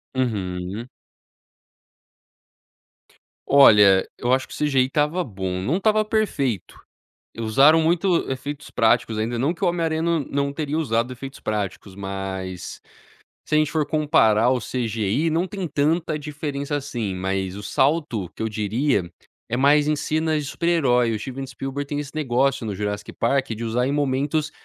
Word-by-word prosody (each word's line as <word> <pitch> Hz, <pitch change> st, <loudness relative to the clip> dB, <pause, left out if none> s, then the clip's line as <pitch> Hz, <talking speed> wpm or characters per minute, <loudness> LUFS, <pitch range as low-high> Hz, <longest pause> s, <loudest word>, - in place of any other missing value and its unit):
Uhum. 100 Hz, -2 st, -2 dB, 2.6 s
Olha, 105 Hz, -9 st, +7 dB
eu 120 Hz, -, -1 dB
acho 130 Hz, -, +1 dB
que -, -, -11 dB
o -, -, -7 dB
CGI 135 Hz, -4 st, +2 dB
estava 150 Hz, +6 st, 0 dB
bom, 95 Hz, -, -4 dB
não 145 Hz, -, 0 dB
estava 215 Hz, +1 st, +2 dB
perfeito. 140 Hz, -, -1 dB, 0.6 s
E 115 Hz, -, -8 dB
usaram 135 Hz, +9 st, +5 dB
muito 170 Hz, 0 st, +1 dB
efeitos 140 Hz, +2 st, -5 dB
práticos 115 Hz, -1 st, +2 dB
ainda, 115 Hz, +2 st, -1 dB
não 140 Hz, +7 st, +1 dB
que 170 Hz, -, -4 dB
o -, -, +4 dB
Homem 170 Hz, -1 st, -1 dB
Aranha 160 Hz, 0 st, 0 dB
não 170 Hz, -1 st, +1 dB
não 140 Hz, 0 st, -2 dB
teria 150 Hz, +1 st, -2 dB
usado 120 Hz, -4 st, 0 dB
efeitos 135 Hz, +2 st, -9 dB
práticos, 100 Hz, -2 st, -4 dB
mas 95 Hz, -2 st, -5 dB, 0.7 s
se -, -, -1 dB
a 155 Hz, -, +5 dB
gente 155 Hz, -1 st, +2 dB
for 155 Hz, -2 st, +1 dB
comparar, 125 Hz, -8 st, +3 dB
o 130 Hz, -, +2 dB
CGI 115 Hz, +5 st, -1 dB
não 170 Hz, +4 st, +1 dB
tem 190 Hz, 0 st, -5 dB
tanta 155 Hz, +2 st, 0 dB
diferença 145 Hz, -1 st, -4 dB
assim, 120 Hz, -9 st, -3 dB
mas 95 Hz, +1 st, -2 dB
o 105 Hz, -, -7 dB
salto 130 Hz, -, 0 dB
que -, -, -6 dB
eu 110 Hz, -, 0 dB
diria 105 Hz, -1 st, 0 dB, 0.4 s
é 120 Hz, -, -1 dB
mais 145 Hz, +2 st, +4 dB
em 150 Hz, -, +3 dB
cena 155 Hz, +1 st, 0 dB
de 150 Hz, -, -4 dB
super-herói. 135 Hz, -7 st, +1 dB
O 110 Hz, -, -2 dB
Steven 135 Hz, +3 st, -6 dB
Spielberg 135 Hz, +2 st, -5 dB
tem 145 Hz, 0 st, -2 dB
esse 145 Hz, -2 st, -7 dB
negócio 135 Hz, -3 st, 0 dB
no 105 Hz, -, -3 dB
Jurassic 105 Hz, 0 st, -4 dB
Park, 135 Hz, +2 st, 0 dB
de 115 Hz, +1 st, -4 dB
usar 120 Hz, +3 st, 0 dB
em 140 Hz, -, 0 dB
momentos 145 Hz, +2 st, 0 dB
135 Hz, 165 wpm, -23 LUFS, 110-150 Hz, 2.6 s, Olha